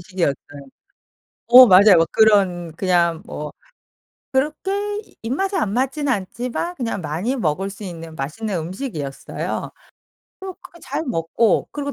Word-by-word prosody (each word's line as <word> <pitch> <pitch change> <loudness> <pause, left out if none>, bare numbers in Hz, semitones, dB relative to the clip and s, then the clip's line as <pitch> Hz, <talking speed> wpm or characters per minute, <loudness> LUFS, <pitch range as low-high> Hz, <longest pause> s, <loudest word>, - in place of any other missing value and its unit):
식이었어요. 175 -6 -1 1.1
어 250 +1 +10
맞아요. 195 -2 +7
막 165 - +2
그런 190 -6 +3
그냥 170 -3 +1
뭐 150 0 -6 0.8
그렇게 300 +8 -1 0.5
입맛에 380 - -1
안 205 -1 -1
맞지는 270 +3 0
않지만 245 - -3
그냥 230 - -3
많이 170 - -2
먹을 190 - -1
수 200 +2 -10
있는 165 -4 -8
맛있는 185 +9 -4
음식이었어요. 165 - -5 0.7
그 380 - -7
그렇게 340 - -15
잘 - - -4
먹고 210 - 0
그리고 285 -1 -4
200 Hz, 280 characters per minute, -21 LUFS, 170-255 Hz, 1.1 s, 어